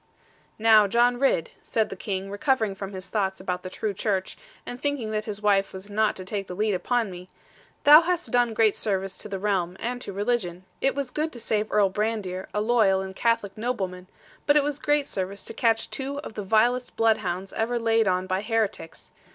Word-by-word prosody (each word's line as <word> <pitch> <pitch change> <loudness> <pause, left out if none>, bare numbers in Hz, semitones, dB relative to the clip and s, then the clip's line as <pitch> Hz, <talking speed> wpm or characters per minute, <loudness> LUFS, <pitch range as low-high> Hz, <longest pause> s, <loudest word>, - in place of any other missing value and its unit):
'Now, 220 -1 +6
John 240 +3 +3
Ridd,' 265 -12 +1
said 220 -1 0
the - - -6
King, 195 -1 -4
recovering 220 0 +1
from 195 0 -7
his 190 -1 -7
thoughts 190 -1 -1
about 180 -1 -3
the 185 - -7
true 210 +2 -3
Church, 195 -1 -2 0.3
and 245 - -7
thinking 285 -7 -1
that 215 0 -2
his 210 -1 -6
wife 200 -1 +2
was 190 +2 -8
not 215 +1 +2
to 185 - -7
take 195 0 -3
the 180 - -6
lead 210 +1 +1
upon 225 +3 0
me; 180 0 -10 0.5
'thou 300 +2 +10
hast 350 0 -2
done 245 -2 +2
great 220 -2 +4
service 195 -2 -2
to - - -8
the 195 - -3
realm, 190 -3 -1
and 245 +1 -3
to - - -4
religion. 195 -3 -2 0.2
It 270 - +2
was 280 -3 -3
good 310 +1 -1
to 240 - -8
save 215 -1 -1
Earl 200 -2 +3
Brandir, 205 -3 -2
a 210 - -1
loyal 215 -4 +3
and 190 0 -7
Catholic 230 -3 0
nobleman; 190 -6 -3 0.4
but 290 0 +6
it 295 - +4
was 290 0 -2
great 295 -1 +1
service 195 -2 -4
to - - -8
catch 225 -1 +1
two 275 +1 -3
of 245 - -9
the 210 - -4
vilest 235 +5 +1
bloodhounds 195 -4 0
ever 230 +2 -1
laid 225 -2 +2
on 185 0 +1
by 185 +1 -1
heretics. 215 -6 -2
210 Hz, 210 wpm, -25 LUFS, 190-240 Hz, 0.5 s, thou